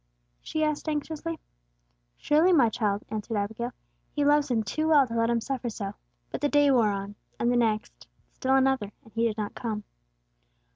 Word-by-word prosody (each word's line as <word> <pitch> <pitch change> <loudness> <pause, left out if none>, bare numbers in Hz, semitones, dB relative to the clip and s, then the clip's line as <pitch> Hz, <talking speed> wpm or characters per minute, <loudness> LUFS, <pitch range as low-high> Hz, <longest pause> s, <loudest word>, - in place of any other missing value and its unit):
she 315 - -2
asked 305 +1 -1
anxiously. 315 +2 -3 0.8
"Surely, 315 +5 +3
my 270 -10 +5
child," 205 -2 -1
answered 215 +1 -3
Abigail. 220 +4 -2 0.4
"He 290 -1 0
loves 295 0 +4
him 230 -3 +1
too 310 +10 -1
well 295 -4 +6
to 230 - -7
let 230 0 +2
him 235 0 +2
suffer 250 0 -3
so." 200 -2 -5 0.4
But - - -4
the 290 - +2
day 290 -1 +4
wore 235 -5 +4
on, 200 0 -4 0.3
and 235 - +2
the - - +2
next; 220 -3 -1 0.3
still 265 +1 +1
another, 265 -6 +2
and 225 - -19
He 230 +1 +2
did 220 -1 -3
not 210 -1 -3
come. 215 -3 -4
240 Hz, 185 wpm, -27 LUFS, 215-290 Hz, 0.8 s, well